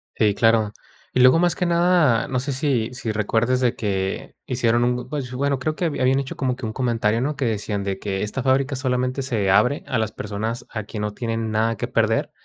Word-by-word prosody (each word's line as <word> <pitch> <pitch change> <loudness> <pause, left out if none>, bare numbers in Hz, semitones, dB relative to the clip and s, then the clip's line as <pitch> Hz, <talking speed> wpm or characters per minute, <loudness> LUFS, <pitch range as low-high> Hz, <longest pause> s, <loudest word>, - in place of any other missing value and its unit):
Sí, 105 -2 +2
claro. 110 -2 +3 0.4
Y 125 - +3
luego, 130 +6 +7
más 175 0 +2
que 180 - -1
nada, 170 -8 +3
no 130 - -1
sé 140 +2 -3
si 130 -4 0
si 120 -3 -3
recuerdes 115 +4 +1
de 120 -2 +2
que 95 -3 -3
hicieron 120 -1 +1
un 125 +1 -1
pues, 140 -4 -4
bueno, 140 +2 0
creo 155 +4 -2
que 175 - -2
habían 135 -3 +2
hecho 135 -1 -5
como 130 -2 -1
que 130 - -6
un 110 - -4
comentario, 115 -3 0
¿no? 145 +3 -1
Que 135 - -1
decían 105 -2 -2
de 95 -1 -2
que 95 -1 -3
esta 115 +5 -3
fábrica 135 +1 +2
solamente 130 0 -1
se 115 -8 -1
abre 125 +8 +3
a 130 - 0
las 110 -1 -1
personas 110 +4 -4
a 110 -1 -4
quien 105 +1 -6
no 105 0 -2
tienen 115 -1 -3
nada 110 +1 +1
que - - -3
perder. - - +1
120 Hz, 220 wpm, -22 LUFS, 110-130 Hz, 0.4 s, luego